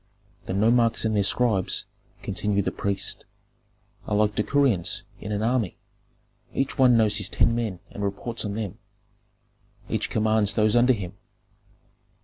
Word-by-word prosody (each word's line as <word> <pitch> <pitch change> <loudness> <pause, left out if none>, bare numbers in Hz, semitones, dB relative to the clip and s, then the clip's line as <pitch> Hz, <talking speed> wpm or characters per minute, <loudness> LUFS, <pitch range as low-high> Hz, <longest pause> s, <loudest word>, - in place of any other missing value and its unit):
The - - -2
nomarchs 115 +3 +3
and 110 -1 +1
their 100 - +3
scribes," 105 -1 +1 0.4
continued 100 0 0
the - - 0
priest, 100 -1 -2 0.8
"are 105 - 0
like 105 0 +2
decurions 115 -5 +1 0.2
in 105 - -6
an 105 +1 -1
army; 115 -4 0 0.8
each 135 - -1
one 125 -3 +6
knows 105 -2 +3
his 100 -2 -2
ten 115 - +2
men 110 -7 -2
and 100 - -6
reports 105 +4 -3
on 105 -1 -3
them. 105 -4 -4 1.1
Each - - -1
commands 110 -1 +2
those 110 0 +3
under 125 +2 +5
him. 100 -3 -6
105 Hz, 140 wpm, -25 LUFS, 100-115 Hz, 1.1 s, one